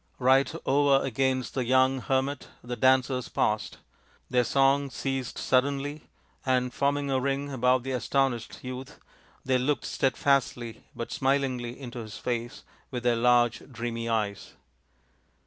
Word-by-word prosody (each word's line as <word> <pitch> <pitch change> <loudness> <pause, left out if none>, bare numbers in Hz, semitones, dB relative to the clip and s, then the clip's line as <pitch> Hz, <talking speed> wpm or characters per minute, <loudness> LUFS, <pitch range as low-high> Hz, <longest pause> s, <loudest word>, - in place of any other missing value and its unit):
Right 130 +2 +4
over 140 0 +3
against 130 0 0
the 130 - -1
young 130 +2 +3
hermit 135 +2 -1 0.2
the 125 0 -4
dancers 130 0 +2
paused. 105 0 -1 0.5
Their 125 -1 +4
song 135 +2 +3
ceased 135 0 -3
suddenly, 140 +3 0 0.3
and, 125 -1 +1
forming 140 0 0
a 130 - +2
ring 140 +2 -1
about 125 -1 +2
the 135 - -4
astonished 130 -2 -1
youth, 130 +1 -7 0.5
they 130 -1 +2
looked 145 +3 0
stead 135 - 0
fastly 125 -5 0
but 115 - -5
smilingly 130 -3 -1
into 125 -3 -7
his 110 -2 -8
face 120 0 -4 0.3
with 125 -2 -5
their 120 -1 +3
large, 120 0 +3
dreamy 115 -1 -4
eyes. 105 -3 -2
130 Hz, 135 wpm, -27 LUFS, 120-135 Hz, 0.5 s, Right